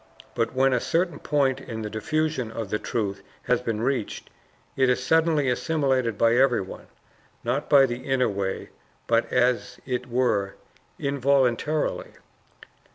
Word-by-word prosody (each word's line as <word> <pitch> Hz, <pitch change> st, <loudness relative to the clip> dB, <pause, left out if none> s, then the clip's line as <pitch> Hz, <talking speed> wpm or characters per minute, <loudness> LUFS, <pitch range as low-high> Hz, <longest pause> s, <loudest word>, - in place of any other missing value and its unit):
But 115 Hz, +1 st, -1 dB
when 135 Hz, 0 st, +3 dB
a 125 Hz, -, +2 dB
certain 170 Hz, +4 st, 0 dB
point 140 Hz, -3 st, +1 dB
in 110 Hz, -1 st, -6 dB
the 105 Hz, -, -4 dB
diffusion 155 Hz, +1 st, -1 dB
of 110 Hz, -3 st, -5 dB
the 105 Hz, -, 0 dB
truth 100 Hz, -5 st, -3 dB, 0.2 s
has 125 Hz, -1 st, +1 dB
been 115 Hz, -2 st, -2 dB
reached, 130 Hz, -4 st, -2 dB, 0.4 s
it 130 Hz, -1 st, +3 dB
is 125 Hz, 0 st, +1 dB
suddenly 160 Hz, 0 st, +2 dB
assimilated 130 Hz, -4 st, 0 dB
by 115 Hz, +1 st, +4 dB
everyone, 125 Hz, -8 st, +1 dB, 0.6 s
not 125 Hz, +5 st, -2 dB
by 140 Hz, -2 st, +7 dB
the 120 Hz, -1 st, -4 dB
inner 135 Hz, -2 st, +1 dB
way, 100 Hz, -2 st, -3 dB, 0.4 s
but, 115 Hz, 0 st, +1 dB
as 125 Hz, 0 st, +1 dB
it 125 Hz, -1 st, -3 dB
were, 120 Hz, -6 st, 0 dB, 0.4 s
involuntarily. 140 Hz, +1 st, 0 dB
125 Hz, 140 wpm, -25 LUFS, 115-140 Hz, 0.6 s, by